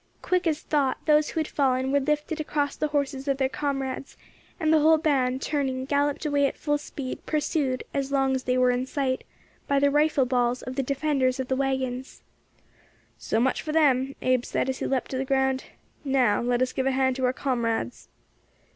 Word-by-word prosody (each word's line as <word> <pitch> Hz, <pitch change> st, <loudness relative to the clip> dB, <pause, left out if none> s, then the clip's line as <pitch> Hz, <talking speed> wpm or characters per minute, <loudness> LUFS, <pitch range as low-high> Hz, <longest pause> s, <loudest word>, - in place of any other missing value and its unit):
Quick 365 Hz, -1 st, +1 dB
as 310 Hz, -2 st, 0 dB
thought, 280 Hz, -4 st, 0 dB
those 300 Hz, -1 st, +4 dB
who -, -, -3 dB
had 310 Hz, -, -1 dB
fallen 260 Hz, -2 st, +1 dB
were 285 Hz, -, +3 dB
lifted 300 Hz, +3 st, -1 dB
across 290 Hz, -1 st, -1 dB
the 305 Hz, -, -1 dB
horses 280 Hz, -2 st, -2 dB
of 275 Hz, -1 st, +1 dB
their 265 Hz, -1 st, +2 dB
comrades, 270 Hz, -1 st, -4 dB, 0.4 s
and 315 Hz, 0 st, +2 dB
the 315 Hz, -, +5 dB
whole 315 Hz, +1 st, +5 dB
band, 270 Hz, -4 st, +1 dB
turning, 265 Hz, -3 st, -1 dB
galloped 285 Hz, +2 st, 0 dB
away 285 Hz, -1 st, +2 dB
at -, -, -6 dB
full 295 Hz, -1 st, 0 dB
speed, 275 Hz, -2 st, -6 dB
pursued, 290 Hz, -4 st, 0 dB
as 275 Hz, -1 st, -2 dB
long 270 Hz, -1 st, +2 dB
as 260 Hz, -1 st, -2 dB
they 250 Hz, 0 st, +1 dB
were 250 Hz, 0 st, +4 dB
in 250 Hz, +1 st, -1 dB
sight, 260 Hz, -2 st, -1 dB, 0.4 s
by 280 Hz, -, +2 dB
the 280 Hz, 0 st, +3 dB
rifle 295 Hz, -2 st, +3 dB
balls 245 Hz, -1 st, 0 dB
of 255 Hz, -, -6 dB
the 275 Hz, -, +1 dB
defenders 270 Hz, -1 st, 0 dB
of 260 Hz, -, -3 dB
the 260 Hz, -, +1 dB
waggons. 265 Hz, -1 st, -2 dB, 1.0 s
"So 220 Hz, -, -1 dB
much 255 Hz, +2 st, +1 dB
for 305 Hz, -, -4 dB
them," 275 Hz, -4 st, +3 dB
Abe 255 Hz, -1 st, +2 dB
said, 265 Hz, -, -1 dB
as 260 Hz, -, -7 dB
he -, -, -2 dB
leapt 265 Hz, -2 st, -1 dB
to 260 Hz, -, -2 dB
the -, -, 0 dB
ground. 265 Hz, -1 st, 0 dB, 0.4 s
"Now 260 Hz, -7 st, +2 dB
let 245 Hz, +1 st, +1 dB
us 255 Hz, -, -2 dB
give 265 Hz, 0 st, -1 dB
a -, -, +3 dB
hand 260 Hz, -1 st, +2 dB
to 260 Hz, -, 0 dB
our 250 Hz, -, +3 dB
comrades." 230 Hz, -, -2 dB
270 Hz, 205 wpm, -26 LUFS, 255-290 Hz, 1.0 s, the